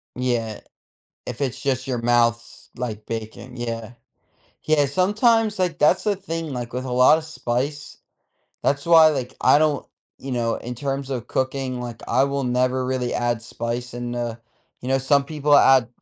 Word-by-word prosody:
Yeah, 120 -4 -2 0.7
if 125 -2 -6
it's 135 -4 -2
just 130 -1 -1
your 130 -2 -2
mouths, 120 0 0
like 110 -4 -5
bacon, 115 +3 -7
yeah, 115 -1 -5 0.7
yeah, 155 -2 +3
sometimes 210 - +2
like, 180 -4 -1
that's 150 - +4
the 210 -2 +1
thing, 165 -5 -5
like, 120 -2 -5
with 125 +1 -3
a 130 - -4
lotta 125 +6 +5
spice 145 -2 -4 0.7
that's 140 0 0
why 165 -2 +8
like, 130 -4 -3
I - - +5
don't, 150 -3 +1 0.3
you 135 - -6
know, 115 -2 0
in 125 +1 -6
terms 135 +2 -3
of 125 -3 -4
cooking, 130 -1 -2
like, 120 -2 -7
I 130 - +3
will 140 0 -2
never 125 +1 +1
really 130 -1 -2
add 120 -1 -1
spice 120 +1 -5
in 120 0 -4
the 120 -1 -4 0.4
you 125 - -5
know, 135 - +3
some 140 +1 +2
people 145 0 +1
add 130 -4 +5
130 Hz, 170 wpm, -23 LUFS, 120-145 Hz, 0.7 s, why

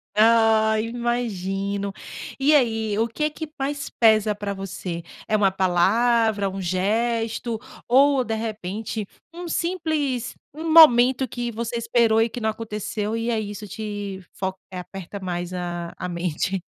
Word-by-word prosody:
Ah 220 0 +4
imagino, 200 -4 -2 0.5
e 290 +3 +4
aí, 225 -6 +2
o 225 - +2
que 300 +7 -1
que 310 +1 -7
mais 280 +1 -2
pesa 215 -2 +3
para 205 -1 -4
você, 190 -3 -5 0.2
é 215 - +2
uma 200 -2 +3
palavra 205 +3 +2
um 195 +1 -5
gesto 225 +5 0 0.3
ou 270 +2 +5
de 225 -2 -2
repente 215 -1 -4 0.3
um 350 +1 -7
simples 315 -8 -1 0.2
um 320 +1 -3
momento 260 -4 +7
que 240 +1 -3
você 235 +1 -3
esperou 230 -1 +3
e 230 - +2
que 245 - -7
não 220 - +1
aconteceu 210 -1 -3
e 230 +1 -2
é 230 -2 +1
isso 210 0 -6
te 205 -2 -5
fo 190 -1 -3 0.2
e - - -8
aperta 190 +2 -7
mais 180 -1 -4
a 175 -1 -4
a 180 - -4
mente. 175 +2 -2
220 Hz, 145 wpm, -23 LUFS, 195-240 Hz, 0.5 s, momento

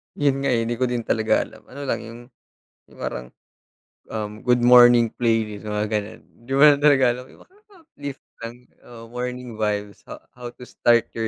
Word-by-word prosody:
Yun 140 -2 +1
nga - - +1
eh, 115 -1 +1
hindi 120 +1 -3
ko 130 - +2
din 120 -1 -2
talaga 110 0 +1
alam. - - -15
Ano 140 +2 -10
lang 135 - -1
yung, 115 +1 -10 0.7
yung - - -19
parang, 60 0 -5 0.8
um, 105 -1 -5
good 125 -1 +1
morning 120 -2 +7
playlist, 110 -3 -1
mga 105 0 -1
ganun. 105 -1 -3
Hindi 120 +3 -16
ko - - +1
lang 145 -1 +7
talaga 145 -3 +4
alam 125 +1 -7
yung - - -18
nakaka-uplift 345 - -12 0.2
lang-oo, 120 0 -11
morning 125 0 -5
vibes 105 -1 -2
ha - - -10
how 125 -1 -9
to 125 - -14
start 120 -1 +2
your 115 -1 -3
120 Hz, 180 wpm, -23 LUFS, 110-130 Hz, 0.8 s, morning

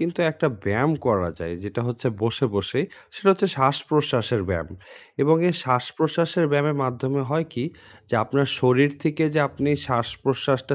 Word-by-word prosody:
কিন্তু 170 +1 -2
একটা 160 +1 0 0.2
ব্যায়াম 125 +11 +2
করা 90 -4 +2
যায়। 85 0 -6
যেটা 105 +3 -4
হচ্ছে 125 +1 -2
বসে, 115 +4 0
বসে 100 +7 -1 0.3
সেটা 195 - 0
হচ্ছে 195 +1 +1
শ্বাসপ্রশ্বাসের 130 -4 +1
ব্যায়াম। 80 -5 -2 0.5
এবং 155 +3 +5
এই 170 - +1
শ্বাস-প্রশ্বাসের 160 +7 +1
ব্যায়ামের 145 +1 +2
মাধ্যমে 130 +2 -1
হয় 160 +1 0
কি? 120 - -3 0.4
যে - - -1
আপনার 140 +3 +1
শরীর 130 +3 +5
থেকে 160 0 0
যে, 155 - +4
আপনি 140 +1 -1 0.2
শ্বাস-প্রশ্বাসটা 130 +2 -1
135 Hz, 150 wpm, -23 LUFS, 120-150 Hz, 0.5 s, এবং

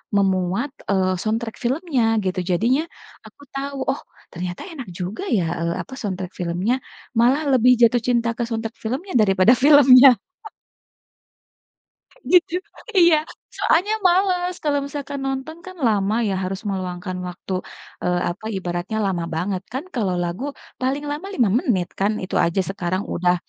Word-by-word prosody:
memuat, 190 +4 +1 0.2
eee, 185 -1 +2
soundtrack 225 +1 -2
filmnya 270 +1 0 0.2
gitu 185 0 -1
jadinya 240 - +2 0.4
aku - - -16
tahu, 275 0 -4
oh, 275 - -5 0.3
ternyata 180 0 -5
enak 275 -8 -8
juga 185 - -4
ya, 185 - +1 0.2
eee, 170 0 -1
apa, - - -11
soundtrack 190 -4 -4
filmnya, 180 +6 0 0.5
malah 255 +6 +4
lebih 250 -1 +5
jatuh 235 +1 +5
cinta 235 -1 +2
ke 240 - -1
soundtrack 225 0 -4
filmnya 270 - -3
daripada 195 +2 +5
filmnya. 275 -2 +9 2.2
Gitu, 360 -2 +5 0.5
iya, 340 -3 +7 0.4
soalnya 405 +6 +2
males 360 0 +2
kalau 290 -2 +1
misalkan 280 0 -5
nonton 270 +4 -4
kan 370 0 -9
lama 205 -1 +1
ya 195 - 0
harus 190 +1 -4
meluangkan 185 -1 -4
waktu, 180 +1 -6 0.5
eee, 180 0 +1
apa 175 - -11
ibaratnya 180 +3 -3
lama 180 -3 -1
banget 180 +3 -2
kan 265 +3 -3
kalau 200 -7 0
lagu, 175 +7 -4 0.4
paling 270 +3 -1
lama 305 +6 -5
5 240 - +2
menit 190 -10 0
kan 200 +2 +2
itu 185 - -4
aja 170 +3 +1
sekarang 185 -1 -2
udah 180 0 +2
220 Hz, 145 wpm, -22 LUFS, 185-275 Hz, 2.2 s, filmnya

